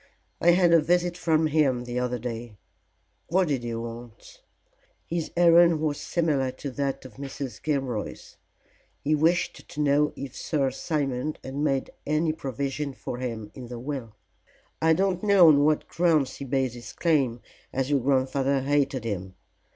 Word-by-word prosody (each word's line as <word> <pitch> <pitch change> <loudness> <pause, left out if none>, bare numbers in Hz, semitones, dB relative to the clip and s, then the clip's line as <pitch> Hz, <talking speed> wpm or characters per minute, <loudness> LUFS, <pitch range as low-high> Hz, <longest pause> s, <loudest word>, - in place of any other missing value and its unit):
"I 170 - +5
had 175 -1 +4
a 165 - +6
visit 175 +2 +1
from 160 -2 +2
him 145 -5 +2
the 120 0 -3
other 125 0 -1
day?" 115 -2 -6 0.7
"What 180 -1 +2
did 135 -4 0
he 120 -1 -3
want?" 115 - -9 0.6
"His 170 -1 -3
errand 170 -1 +6
was 150 -2 -1
similar 150 -6 0
to 135 +1 -6
that 135 0 -3
of 130 -3 -12
Mrs. 135 -1 -6
Gilroy's. 135 -8 -3 0.7
He 150 - +1
wished 165 +3 +1
to - - -8
know 150 0 +3
if 135 -1 -7
Sir 140 -4 0
Simon 140 0 -2
had 130 - -7
made 140 -2 0 0.2
any 155 +1 +1
provision 140 0 -3
for 125 -1 -6
him 115 -4 -5
in 125 -2 -9
the 120 0 -7
will. 125 -4 -5 0.7
I 160 0 +5
don't 185 +1 +1
know 200 -5 +7
on 145 -2 +5
what 155 0 +1
grounds 160 -6 +1
he 140 - -6
based 130 -2 0
his 120 -1 -9
claim, 135 -8 +1 0.3
as 135 +1 -1
your 140 - +3
grandfather 135 +1 +1
hated 140 -2 +1
him. 95 -4 -4
140 Hz, 160 wpm, -26 LUFS, 125-155 Hz, 0.7 s, know